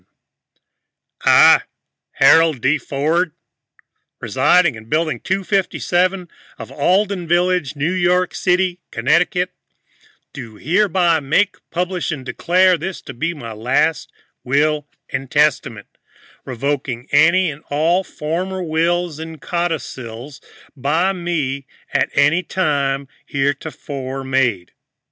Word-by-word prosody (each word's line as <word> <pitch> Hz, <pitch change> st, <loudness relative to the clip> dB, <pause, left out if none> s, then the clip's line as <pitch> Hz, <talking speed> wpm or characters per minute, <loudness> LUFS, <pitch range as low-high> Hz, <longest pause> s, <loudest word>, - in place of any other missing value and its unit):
"I, -, -, +7 dB, 0.5 s
Harold 160 Hz, -4 st, +5 dB
D. 135 Hz, +6 st, +1 dB
Ford, 155 Hz, +6 st, -1 dB, 0.9 s
residing 180 Hz, -4 st, +3 dB
in 110 Hz, -1 st, -11 dB
Building 155 Hz, +2 st, 0 dB
257 185 Hz, -1 st, 0 dB, 0.3 s
of -, -, -9 dB
Alden 190 Hz, -1 st, 0 dB
Village, 175 Hz, -4 st, +1 dB
New 145 Hz, +4 st, -1 dB
York 180 Hz, 0 st, +1 dB
City, 180 Hz, 0 st, 0 dB
Connecticut, 180 Hz, -, +1 dB, 0.8 s
do 115 Hz, -5 st, -9 dB
hereby 175 Hz, -, +2 dB
make, 185 Hz, +7 st, +1 dB
publish 180 Hz, 0 st, -2 dB
and 135 Hz, -4 st, -6 dB
declare 180 Hz, +4 st, +2 dB
this 185 Hz, +3 st, -5 dB
to 135 Hz, -, -8 dB
be 165 Hz, +8 st, -2 dB
my 115 Hz, -6 st, -8 dB
last 135 Hz, +8 st, 0 dB, 0.3 s
Will 150 Hz, +3 st, +1 dB, 0.2 s
and 135 Hz, -1 st, -4 dB
Testament, 145 Hz, -8 st, 0 dB, 0.5 s
revoking 130 Hz, -1 st, -3 dB
any 170 Hz, +4 st, +4 dB
and 145 Hz, +1 st, -12 dB
all 165 Hz, +6 st, +1 dB
former 185 Hz, +4 st, -4 dB
wills 170 Hz, 0 st, 0 dB
and 160 Hz, -1 st, -8 dB
codicils 135 Hz, -7 st, -4 dB, 0.3 s
by 160 Hz, +8 st, +1 dB
me 150 Hz, -7 st, -3 dB, 0.3 s
at -, -, +1 dB
any 150 Hz, +5 st, +3 dB
time 140 Hz, -7 st, -1 dB, 0.2 s
heretofore 140 Hz, -1 st, -3 dB
made." 125 Hz, -9 st, 0 dB
160 Hz, 105 wpm, -19 LUFS, 135-180 Hz, 0.9 s, I